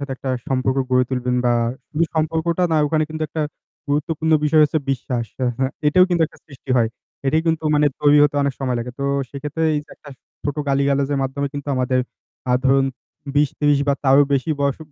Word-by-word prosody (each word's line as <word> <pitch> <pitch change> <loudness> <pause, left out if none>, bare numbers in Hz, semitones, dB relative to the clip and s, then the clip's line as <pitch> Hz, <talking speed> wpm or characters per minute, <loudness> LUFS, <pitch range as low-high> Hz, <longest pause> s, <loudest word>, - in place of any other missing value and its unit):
সাথে 140 -1 -4
একটা 130 - -4 0.2
সম্পর্ক 130 0 0
গড়ে 125 0 +4
তুলবেন 125 -1 -1
বা 120 - +3 0.4
শুধু 160 +2 +2
সম্পর্কটা 160 +2 0
না, - - +3
ওখানে 155 +1 +1
কিন্তু 155 0 -5
একটা 155 +1 -2 0.5
গুরুত্বপূর্ণ 160 +2 0
বিষয় 155 +1 +4
হচ্ছে 155 +1 0
বিশ্বাস। 125 -2 -2 0.2
আ - - +2
হ্যাঁ, 130 0 0
এটাও 180 +5 +6
কিন্তু 170 -2 +2
একটা - - -20
সৃষ্টি 135 -2 -12
হয়। 115 -2 +3 0.4
এটাই 155 +4 +2
কিন্তু 160 -1 0
মানে 150 0 +4
তৈরি 145 0 +5
হতে 145 0 +2
অনেক 140 -1 0
সময় 130 -2 -1
লাগে। 125 +1 -5
তো 140 - -2 0.3
সেক্ষেত্রে 145 +3 -4
এইযে 150 0 -4
একটা 150 - -15 0.4
ছোট 145 0 -2
গালিগালাজের 140 0 +1
মাধ্যমে 135 +2 -2
কিন্তু 145 0 -6
আমাদের 130 0 +1 0.5
আ - - +4
ধরুন 135 0 +4 0.5
২০-৩০ 145 0 +2
বা 140 - +4
তারও 135 0 +5 0.2
বেশি 140 +3 +1
বয়স 140 -1 0
140 Hz, 190 wpm, -21 LUFS, 135-155 Hz, 0.5 s, এটাও